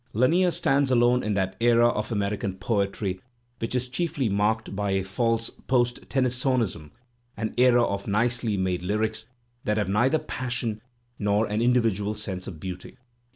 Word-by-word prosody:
Lanier 165 Hz, -, +3 dB
stands 140 Hz, -4 st, +1 dB
alone 120 Hz, 0 st, +4 dB
in 105 Hz, -1 st, -1 dB
that 95 Hz, -1 st, -1 dB
era 120 Hz, 0 st, +5 dB
of 105 Hz, -1 st, -3 dB
American 100 Hz, -2 st, -1 dB
poetry 100 Hz, -2 st, -1 dB, 0.4 s
which 115 Hz, +2 st, -3 dB
is 125 Hz, 0 st, 0 dB
chiefly 140 Hz, -1 st, -1 dB
marked 105 Hz, +1 st, 0 dB
by 100 Hz, 0 st, -1 dB
a 95 Hz, -1 st, +1 dB
false 115 Hz, +3 st, -1 dB, 0.2 s
post 120 Hz, -2 st, 0 dB
Tennysonism, 125 Hz, -, 0 dB, 0.5 s
an 110 Hz, +1 st, -3 dB
era 125 Hz, -1 st, +5 dB
of 100 Hz, -3 st, -2 dB
nicely 115 Hz, 0 st, +1 dB
made 95 Hz, -2 st, -1 dB
lyrics 110 Hz, +3 st, -1 dB, 0.4 s
that 105 Hz, 0 st, 0 dB
have 105 Hz, -3 st, 0 dB
neither 120 Hz, +9 st, +3 dB
passion 125 Hz, -6 st, -3 dB, 0.4 s
nor 105 Hz, +1 st, +2 dB
an 105 Hz, +1 st, -1 dB
indi 125 Hz, +1 st, +4 dB
vidual 105 Hz, -1 st, -1 dB
sense 95 Hz, -3 st, -4 dB
of 85 Hz, -5 st, -8 dB
beauty. 90 Hz, +6 st, -7 dB
110 Hz, 155 wpm, -26 LUFS, 100-125 Hz, 0.5 s, era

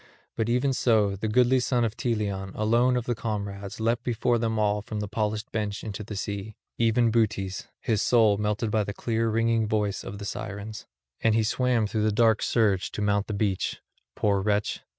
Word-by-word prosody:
But 115 Hz, 0 st, -1 dB
even 125 Hz, +3 st, +2 dB
so 110 Hz, -6 st, +2 dB
the 105 Hz, +3 st, -3 dB
goodly 125 Hz, +4 st, +4 dB
son 125 Hz, -1 st, +1 dB
of 110 Hz, -1 st, -3 dB
Teleon 100 Hz, -5 st, -2 dB
alone 120 Hz, +4 st, +3 dB
of 120 Hz, -, -2 dB
the 120 Hz, -, 0 dB
comrades 100 Hz, -3 st, -4 dB
leapt 115 Hz, +2 st, 0 dB
before 120 Hz, 0 st, +1 dB
them 110 Hz, -1 st, -1 dB
all 105 Hz, -1 st, +1 dB
from 105 Hz, 0 st, -5 dB
the 105 Hz, -, -3 dB
polished 110 Hz, +1 st, -2 dB
bench 105 Hz, -2 st, -3 dB
into 105 Hz, -1 st, -5 dB
the 105 Hz, 0 st, -7 dB
sea, 100 Hz, +1 st, -4 dB, 0.2 s
even 115 Hz, 0 st, +3 dB
Butes, 105 Hz, -4 st, 0 dB
his 110 Hz, -3 st, 0 dB
soul 110 Hz, -4 st, +4 dB
melted 105 Hz, +1 st, -1 dB
by 110 Hz, -1 st, +2 dB
the 100 Hz, +1 st, -5 dB
clear 115 Hz, -1 st, 0 dB
ringing 115 Hz, 0 st, +1 dB
voice 105 Hz, -2 st, -1 dB
of 100 Hz, -, -7 dB
the 100 Hz, -, -7 dB
Sirens; 105 Hz, +1 st, -6 dB, 0.3 s
and 110 Hz, -1 st, +2 dB
he 115 Hz, -, +3 dB
swam 120 Hz, 0 st, +1 dB
through 105 Hz, +1 st, -1 dB
the 110 Hz, 0 st, +2 dB
dark 110 Hz, 0 st, +3 dB
surge 100 Hz, -5 st, +1 dB
to -, -, -4 dB
mount 100 Hz, 0 st, +1 dB
the 105 Hz, -, -3 dB
beach, 100 Hz, -2 st, -1 dB, 0.4 s
poor 100 Hz, -2 st, +1 dB
wretch. 105 Hz, +1 st, 0 dB
110 Hz, 195 wpm, -26 LUFS, 105-115 Hz, 0.4 s, goodly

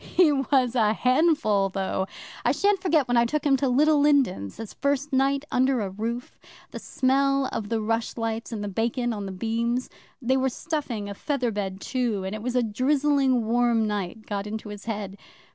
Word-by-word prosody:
He 350 Hz, -4 st, +3 dB
was 270 Hz, -3 st, +2 dB
a 220 Hz, -4 st, +3 dB
handful, 255 Hz, -6 st, +2 dB
though! 190 Hz, 0 st, -2 dB, 0.4 s
I -, -, +3 dB
shan't 400 Hz, -1 st, +2 dB
forget 320 Hz, -8 st, +2 dB
when 245 Hz, 0 st, +2 dB
I 235 Hz, -, +5 dB
took 300 Hz, +5 st, -2 dB
him 280 Hz, -2 st, +4 dB
to 270 Hz, -1 st, 0 dB
Little 295 Hz, +4 st, +4 dB
Lindens 275 Hz, -, +2 dB
his 225 Hz, -2 st, -7 dB
first 280 Hz, +1 st, -1 dB
night 275 Hz, +2 st, +2 dB
under 260 Hz, 0 st, +2 dB
a 195 Hz, -2 st, -3 dB
roof. 230 Hz, +5 st, -5 dB, 0.3 s
The -, -, -6 dB
smell 275 Hz, +1 st, +1 dB
of 210 Hz, -2 st, -4 dB
the 230 Hz, -1 st, 0 dB
rushlights 225 Hz, +1 st, -2 dB
and 215 Hz, -2 st, -4 dB
the -, -, -3 dB
bacon 230 Hz, +4 st, -1 dB
on 205 Hz, -2 st, -5 dB
the -, -, -5 dB
beams 230 Hz, +5 st, -2 dB, 0.3 s
they 260 Hz, 0 st, +1 dB
were 265 Hz, 0 st, +1 dB
stuffing 260 Hz, -7 st, -4 dB
a 200 Hz, -, -5 dB
feather 250 Hz, +2 st, -1 dB
bed 195 Hz, -2 st, -4 dB
too, 235 Hz, -6 st, -1 dB
and 190 Hz, +1 st, -4 dB
it 215 Hz, -, -5 dB
was 250 Hz, +2 st, -3 dB
a 250 Hz, -, +3 dB
drizzling 265 Hz, +1 st, +2 dB
warm 235 Hz, -1 st, +2 dB
night 210 Hz, 0 st, -4 dB
got 200 Hz, -1 st, -3 dB
into 215 Hz, 0 st, -6 dB
his 205 Hz, -1 st, -9 dB
head. 205 Hz, -3 st, -5 dB
240 Hz, 195 wpm, -25 LUFS, 210-275 Hz, 0.4 s, I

